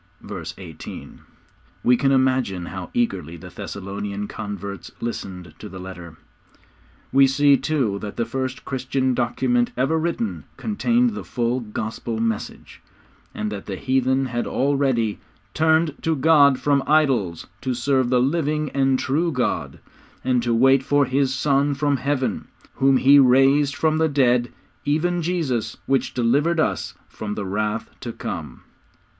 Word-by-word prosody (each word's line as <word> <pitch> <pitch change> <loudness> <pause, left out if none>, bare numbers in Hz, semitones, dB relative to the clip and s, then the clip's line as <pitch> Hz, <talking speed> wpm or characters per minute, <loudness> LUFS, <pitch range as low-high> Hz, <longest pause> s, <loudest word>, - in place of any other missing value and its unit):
_' - - -12
(Verse 85 -5 -6
18.) 85 -5 -10 0.6
We 125 - +5
can 135 +3 +2
imagine 130 -9 +1
how 90 +1 -7
eagerly 95 -9 -1
the 90 +1 -11
Thessalonian 100 +2 -5
converts 100 -2 -6
listened 95 -6 -6
to 105 - -8
the 95 - -9
letter. 90 -3 -9 0.9
We 135 +1 +6
see, 140 +1 +4
too, 130 -7 0
that 105 -1 -6
the 115 - 0
first 130 -1 -4
Christian 130 0 -1
document 120 0 +1
ever 140 +6 +1
written 170 +8 -2
contained 235 +3 +1
the 215 - -6
full 120 0 -1
Gospel 110 0 -4
message, 115 -1 -4 0.5
and 105 0 -3
that 100 -2 -7
the 100 - -3
heathen 130 +3 +1
had 120 -1 -2
already 135 -6 +1 0.3
'_turned 160 -1 +2
to 160 0 +1
God 140 -2 +5
from 140 -1 +2
idols 130 - +2 0.2
to 130 -2 -2
serve 130 0 +1
the 125 0 +3
living 150 +2 0
and 135 -1 +2
true 160 +7 0
God; 125 -4 -2 0.5
and 125 -2 +2
to 120 0 -1
wait 135 +3 +5
for 145 +1 +2
His 135 +1 +1
Son 140 +1 +1
from 145 0 +1
Heaven, 135 0 -2 0.3
whom 135 0 +3
He 140 +2 +6
raised 135 +2 +4
from 155 0 +1
the 160 0 +3
dead, 125 -4 +2 0.3
even 175 +4 0
Jesus, 160 -9 -1
which 135 -1 0
delivered 145 +8 +2
us - - -1
from 105 -1 -6
the 100 - -4
wrath 105 +3 -2
to - - -5
come. - - -6
130 Hz, 150 wpm, -22 LUFS, 110-145 Hz, 0.9 s, We